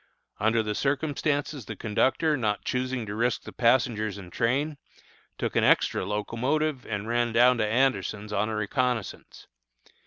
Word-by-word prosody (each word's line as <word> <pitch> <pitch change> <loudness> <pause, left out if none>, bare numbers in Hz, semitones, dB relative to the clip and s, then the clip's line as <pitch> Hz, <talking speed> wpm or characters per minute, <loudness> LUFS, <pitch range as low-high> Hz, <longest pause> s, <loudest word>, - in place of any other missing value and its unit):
Under 110 +2 +2
the 105 -1 -2
circumstances 145 0 -1
the - - -6
conductor, 135 +8 +1
not 110 -6 -1
choosing 125 -1 -2
to 100 - -5
risk 120 +3 0
the - - -9
passengers 115 -4 +2
and 90 -3 -11
train, 140 +5 0 0.6
took - - -3
an - - +3
extra - - +3
locomotive 125 +8 -1
and 105 -1 -3
ran 120 0 +1
down 120 +1 +5
to 110 - +2
Anderson's 110 -3 0
on 105 +2 0
a 110 - -2
reconnoissance. 115 +1 -2
120 Hz, 150 wpm, -27 LUFS, 105-130 Hz, 0.6 s, down